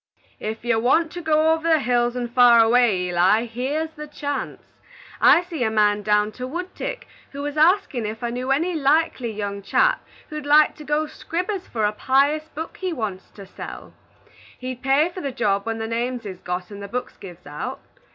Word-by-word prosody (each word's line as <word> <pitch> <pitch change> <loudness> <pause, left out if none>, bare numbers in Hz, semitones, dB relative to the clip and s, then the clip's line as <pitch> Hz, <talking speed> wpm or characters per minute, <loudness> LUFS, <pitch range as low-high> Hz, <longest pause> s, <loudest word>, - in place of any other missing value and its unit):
"Ef 220 +2 -5
you 230 -2 +2
want 310 +7 +2
ter 350 - -6
go 315 0 +3
over 325 0 -2
the 320 - +5
hills 240 -2 +1
and 240 -1 -4
far 245 -2 +7
away, 225 -4 +4
Eli, 185 +6 +3
here's 270 +7 -3
the 300 -1 -9
chance. 285 -1 -5 0.5
I 345 - +6
see 335 -7 -4
a 220 - +2
man 210 -1 +2
down 210 0 +2
to 250 +3 -6
Woodtick 365 - -5 0.3
who 280 +1 -5
was 290 0 -4
askin' 310 - +2
ef 220 +2 -6
I 235 - -1
knew 250 +2 -4
any 325 +7 +1
likely 290 -5 +1
young 200 -1 -4
chap - - +2 0.3
who'd 305 -1 -6
like 300 +1 +6
to 300 - -10
git 300 +1 -1
'scribers 365 +3 -4
for 220 -2 -1
a 210 - +2
pious 280 +7 +1
book 320 +2 -7
he 370 -1 -3
wants 210 - -4
to 200 - -10
sell. 190 - -9 0.6
He'd 255 -1 -6
pay 275 +5 +3
for 365 +1 -8
the 275 - -3
job 200 -4 0
when 225 0 -2
the 225 - -3
names 235 +1 -3
is 190 -3 -7
got 180 +2 -5
and 200 0 -8
the 200 - -6
books 245 +4 -5
give 180 -2 -12
out. 145 +1 -5
250 Hz, 200 wpm, -23 LUFS, 215-310 Hz, 0.6 s, far